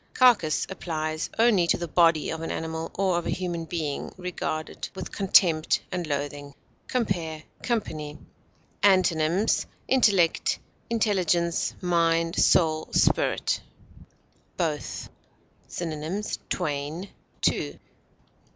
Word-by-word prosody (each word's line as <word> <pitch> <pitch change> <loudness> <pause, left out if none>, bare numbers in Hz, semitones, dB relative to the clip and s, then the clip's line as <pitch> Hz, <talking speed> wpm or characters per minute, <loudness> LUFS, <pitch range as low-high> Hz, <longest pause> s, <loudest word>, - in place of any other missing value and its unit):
Carcass 230 -12 +4
applies 155 -4 -3
only 220 -7 +4
to - - +3
the 170 - -4
body 165 -2 +3
of 160 - -4
an 165 - -4
animal, 160 0 -3
or 185 -3 +2
of 175 - -6
a - - -1
human 175 -2 -2
being 155 -4 -3
regarded 175 -3 -4
with - - -6
contempt 175 -5 +4
and 180 -3 -3
loathing. 145 -1 -4 0.3
Compare 170 -10 -2 0.2
COMPANY. 155 -11 -3 0.6
Antonyms: 185 0 +3 0.2
intellect, 205 -10 +3 0.3
intelligence, 180 -7 +1
mind, 165 -1 +2
soul, 155 -2 +3
spirit. - - +2 1.0
BOTH. 155 -4 -2 0.6
Synonyms: 165 +5 -4
twain, 155 +3 -3 0.3
two. - - 0
170 Hz, 100 wpm, -26 LUFS, 155-185 Hz, 1.0 s, Carcass